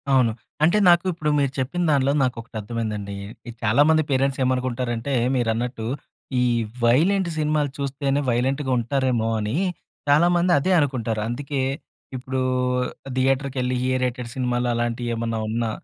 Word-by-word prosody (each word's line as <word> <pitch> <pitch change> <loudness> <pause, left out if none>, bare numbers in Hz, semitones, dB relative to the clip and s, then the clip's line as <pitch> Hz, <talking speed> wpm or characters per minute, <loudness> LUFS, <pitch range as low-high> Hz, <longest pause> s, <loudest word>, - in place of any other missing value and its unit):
అవును. 130 -4 +4 0.3
అంటే, 170 +6 +4
నాకు 175 +1 +5
ఇప్పుడు 155 -3 -2
మీరు 140 -2 +1
చెప్పిన 160 +8 -1
దానిలో 140 -1 +3
నాకొకటర్థమైందండీ. 110 -4 -4 0.3
ఈ - - -5
చాలా 115 +6 +4
మంది 155 0 +4
పేరెంట్సేమనుకుంటారంటే, 130 -2 0 0.2
మీరన్నట్టు 120 -1 -1 0.6
ఈ - - +3 0.4
వైలెంట్ 170 +10 +3
సినిమాలు 150 -1 +1
చూస్తేనే 140 0 -1
వైలెంట్‌గుంటారేమో 130 -1 0
అనీ 105 +3 -2 0.5
చాలా 150 +4 +5
మంది 175 +1 +2
అదే 185 +7 0
అనుకుంటారు. 120 -7 -1
అందుకే 135 +3 -3 0.5
ఇప్పుడూ 130 +1 -3 0.8
థియేటర్‌కెళ్లి 130 -1 0 0.2
ఏ - - +2
రేటెడ్ 125 -1 -3
సినిమాలు 125 -1 0
అలాంటియేమన్నా 115 -1 -2
ఉన్నా, 115 +1 -1
130 Hz, 115 wpm, -23 LUFS, 120-140 Hz, 0.8 s, నాకు